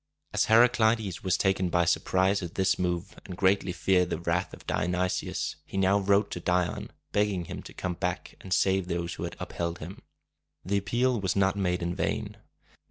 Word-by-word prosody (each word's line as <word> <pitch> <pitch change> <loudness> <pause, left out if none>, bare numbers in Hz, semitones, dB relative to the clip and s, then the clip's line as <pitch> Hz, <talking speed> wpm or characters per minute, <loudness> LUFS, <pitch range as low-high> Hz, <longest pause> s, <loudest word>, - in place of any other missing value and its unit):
As - - +2
Heraclides 110 -4 +3
was 95 -3 +2
taken 95 -2 +1
by 85 0 +2
surprise 95 +4 +2
at 85 -2 -6
this 95 -1 +2
move, 90 +1 -2
and 90 -3 -8
greatly 95 -1 +2
feared 90 -1 +2
the - - -1
wrath 85 +3 -1
of - - -12
Dionysius, 90 +2 -1
he - - -7
now 95 +1 +3
wrote 100 +1 +2
to - - -4
Dion, 90 0 0 0.2
begging 100 -4 +1
him - - -6
to - - -11
come 90 -1 -3
back 90 0 -3
and 95 - -10
save 95 0 +2
those 85 -1 -2
who - - -4
had - - -6
upheld 85 0 -3
him. 85 +4 -9 0.6
The 100 +2 +1
appeal 120 +4 +1
was 95 - 0
not 95 0 +2
made 90 -3 0
in 85 0 -1
vain. - - -2
95 Hz, 185 wpm, -28 LUFS, 90-100 Hz, 0.6 s, Heraclides